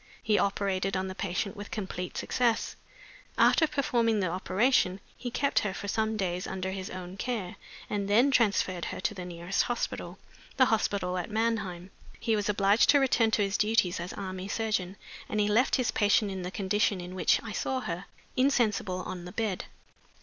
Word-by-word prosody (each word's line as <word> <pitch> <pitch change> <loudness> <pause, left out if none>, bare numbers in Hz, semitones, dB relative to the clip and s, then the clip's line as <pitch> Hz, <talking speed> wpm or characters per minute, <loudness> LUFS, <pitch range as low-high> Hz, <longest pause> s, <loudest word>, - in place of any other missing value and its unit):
He 210 -2 +3
operated 195 -1 0
on 190 0 -2
the - - -5
patient 195 +1 -2
with 205 0 -8
complete 185 -4 -5
success. 240 -3 0 0.6
After 320 - +5
performing 235 -6 +1
the 185 -3 0
operation 190 +2 +2 0.2
he 245 - -5
kept 280 +4 +1
her 200 -2 -2
for 205 - -5
some 220 +2 0
days 180 -2 -2
under 190 0 -3
his 190 0 -5
own 185 0 -7
care, 205 -4 -3 0.3
and 200 -1 -2
then 235 +7 +4
transferred 200 -7 +2
her - - -5
to 185 - -1
the 185 -3 -7
nearest 175 +2 -1
hospital 245 - -3 0.4
the 260 - +6
hospital 190 -4 0
at 175 - -5
Mannheim. 210 -5 -1 0.3
He 225 - +1
was 210 -1 -1
obliged 200 +1 +4
to 285 - +7
return 250 -4 +3
to 215 -1 +2
his 195 +1 -1
duties 210 -5 +2
as 175 +2 -5
army 190 -1 -5
surgeon, 205 -4 -1 0.3
and 210 - -1
he 205 - +3
left 225 +5 +3
his 250 -3 +1
patient 205 0 +3
in 190 -1 -4
the 180 - -4
condition 195 +1 0
in 180 +1 -7
which 185 - +3
I 225 - -6
saw 260 +6 -1
her, 175 -1 -4 0.3
insensible 220 -8 +1
on 180 -1 -6
the 180 - -7
bed. 210 -2 -2
200 Hz, 185 wpm, -29 LUFS, 185-225 Hz, 0.6 s, to